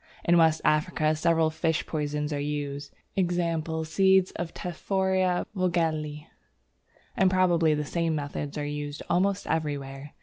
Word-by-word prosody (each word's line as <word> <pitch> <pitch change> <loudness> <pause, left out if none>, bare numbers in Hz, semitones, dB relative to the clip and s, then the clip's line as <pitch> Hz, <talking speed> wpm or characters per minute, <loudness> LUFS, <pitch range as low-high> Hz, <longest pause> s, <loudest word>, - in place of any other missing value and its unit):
In 175 - +4
West 160 -2 +4
Africa 155 0 +2
several 160 0 +2
fish 160 0 0
poisons 150 -1 -2
are 145 - -2
in 145 - -2
use 145 -1 -4 0.3
(e.g. 170 -3 0
seeds 190 +3 +3
of 170 -1 -5
Tephrosia 185 +1 0
Vogelii), 160 -5 -1 0.9
and 190 - +4
probably 175 -4 +3
the 150 0 -2
same 165 +1 -1
methods 145 0 -4
are 145 - -2
used 145 0 -5
almost 195 +3 +1
everywhere. 145 -3 -3
160 Hz, 135 wpm, -27 LUFS, 150-175 Hz, 0.9 s, In